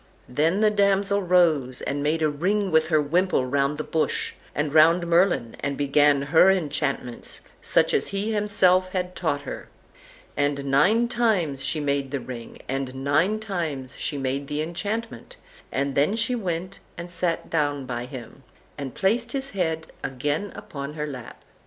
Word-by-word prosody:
Then 160 +10 +1
the 215 -1 +4
damsel 200 0 +2
rose, 165 -9 +2
and 145 +1 -2
made 155 +2 0
a - - +4
ring 190 +7 0
with 160 0 +4
her 155 -2 +3
wimple 165 -1 +1
round 140 +2 0
the 155 - -3
bush, 160 0 -1 0.2
and 150 -1 -1
round 165 +3 +5
Merlin, 170 -9 +2
and 140 0 -3
began 145 0 +3
her 160 +6 +5
enchantments, 145 -8 -2 0.2
such - - +2
as - - +1
he 200 +3 -2
himself 190 -3 +3
had 180 -1 -2
taught 145 -5 -1
her; - - -7 0.7
and 145 -1 0
nine 185 - +3
times 190 - 0
she 155 +3 +1
made 140 -2 -1
the 140 0 -2
ring, 120 -3 -9
and 135 -1 -3
nine 150 +10 +1
times 160 - -4
she 145 - -3
made 135 +1 -2
the 150 +2 -2
enchantment, 215 - -4 0.4
and 140 +1 -1
then 145 +10 +2
she 230 +2 0
went 185 -4 -3 0.2
and 175 +1 -6
sat 175 -1 -2
down 145 -4 0
by 120 -1 -4
him, 130 0 -10 0.4
and 135 -3 -6
placed 230 +5 0
his 275 0 -3
head 160 -4 -1 0.2
again 145 +9 -2
upon 150 -8 -7
her 150 -1 -3
lap. 130 -5 -9
155 Hz, 165 wpm, -25 LUFS, 140-190 Hz, 0.7 s, round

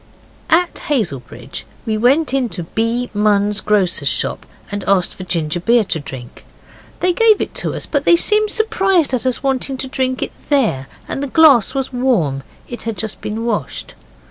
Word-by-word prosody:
At 345 +2 +3
Hazelbridge 215 - -3 0.2
we 220 -2 -1
went 260 +7 +2
into 245 -9 -1
B. 230 +7 -2
Munn's 210 0 +2
grocer's 200 -4 +1
shop - - -2 0.2
and 205 -1 -3
asked 195 -2 +2
for 185 - -9
ginger 165 -2 -1
beer 230 +5 +3
to 185 -5 -2
drink. 130 -4 -9 0.6
They 360 0 +2
gave 445 +1 +4
it - - -2
us, - - -3
but - - -1
they 345 - +6
seemed 425 +4 +3
surprised 385 - +1
at 255 0 0
us 255 - -1
wanting 270 0 0
to 265 - -4
drink 260 0 -1
it - - -4 0.2
there, 220 - +1 0.2
and - - -4
the 285 - -2
glass 275 -5 +5
was 270 -1 -2
warm 210 - +1 0.3
it 240 - -7
had 225 -3 -4
just 215 +3 -3
been 220 +2 -4
washed. 225 -3 -3
240 Hz, 170 wpm, -18 LUFS, 205-275 Hz, 0.6 s, they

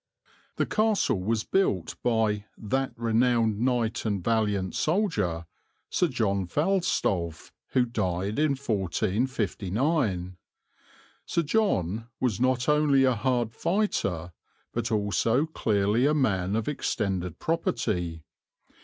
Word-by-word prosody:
The - - +1
castle 215 - +1
was 110 +3 0
built 105 - 0
by 110 -3 +1
"that 130 +5 -1
renowned 115 -2 +2
knight 120 -2 0
and 100 -5 -1
valiant 105 -4 0
soldier" 110 - 0 0.5
Sir 180 - +2
John 100 - 0
Falstolf, 100 - 0 0.2
who 125 -1 +4
died 100 -1 -2
in 155 -2 +3
1459. 105 - -1 0.9
Sir 170 - +1
John 115 - 0
was 120 -5 0
not 130 -1 +2
only 150 -2 +4
a 130 -1 +4
hard 120 -1 0
fighter, 105 - -1 0.4
but 120 0 -2
also 110 - +2
clearly 110 -4 +1
a 150 - +2
man 100 -8 +1
of 110 -1 -1
extended 95 - -2
property. 90 - -1
115 Hz, 110 wpm, -27 LUFS, 95-135 Hz, 0.9 s, who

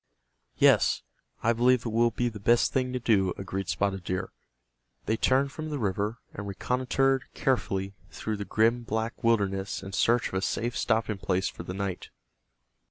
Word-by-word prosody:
"Yes, - - +4 0.4
I 115 - +4
believe 125 +1 +3
it - - -1
will 120 +2 +3
be 120 +1 -1
the 110 -3 -5
best 120 +4 +3
thing 130 -1 0
to 125 - -2
do," 100 -6 +2
agreed 95 0 -4
Spotted 95 -2 -1
Deer. 95 +1 -3 0.7
They 110 - +1
turned 135 +4 +2
from 155 +1 -6
the 150 - -2
river, 105 0 -1 0.2
and 100 0 -6
reconnoitered 130 +6 0
carefully 100 -7 0 0.2
through 110 -1 -4
the 100 - -3
grim 115 +4 +2
black 115 +1 -3
wilderness 100 -4 +1
in 95 - -8
search 115 +5 +2
of - - -15
a 95 - 0
safe 120 +4 -1
stopping 110 -2 0
place 95 +1 0
for - - -9
the 90 +2 -6
night. 95 -2 -4
110 Hz, 170 wpm, -28 LUFS, 95-120 Hz, 0.7 s, Yes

